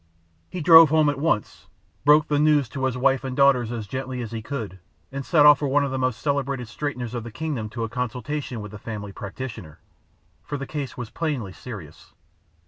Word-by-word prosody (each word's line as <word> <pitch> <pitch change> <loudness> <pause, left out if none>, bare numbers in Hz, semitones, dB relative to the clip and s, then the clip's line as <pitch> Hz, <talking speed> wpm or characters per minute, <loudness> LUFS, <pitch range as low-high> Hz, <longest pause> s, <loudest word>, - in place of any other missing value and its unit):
He 180 - -5
drove 165 0 +9
home 155 -1 +4
at 145 -1 -2
once, 140 -9 -1 0.4
broke 150 +1 +6
the 145 -1 +1
news 150 -3 +3
to 135 +2 -3
his 130 -1 -1
wife 135 +1 +2
and 130 0 -5
daughters 135 -4 +4
as 115 -3 -4
gently 130 +3 -5
as 115 - -7
he 115 -1 -4
could, 110 -6 -6 0.3
and 135 +1 -4
sent 150 0 +4
off 150 -1 +8
for 145 - -1
one 140 +2 +2
of 140 - -3
the 130 - -2
most 130 -3 -1
celebrated 140 -4 -1
straighteners 125 -1 -4
of 120 -2 -4
the 115 - -7
kingdom 125 -3 -4
to 115 +1 -4
a - - -1
consultation 125 +2 -4
with 105 -1 -8
the 105 - -9
family 105 -3 -6
practitioner, 105 - -8 0.6
for 145 - -5
the 140 - -5
case 145 -3 -5
was 120 -2 -6
plainly 140 - -3
serious. 95 - -10
130 Hz, 210 wpm, -24 LUFS, 115-145 Hz, 0.6 s, drove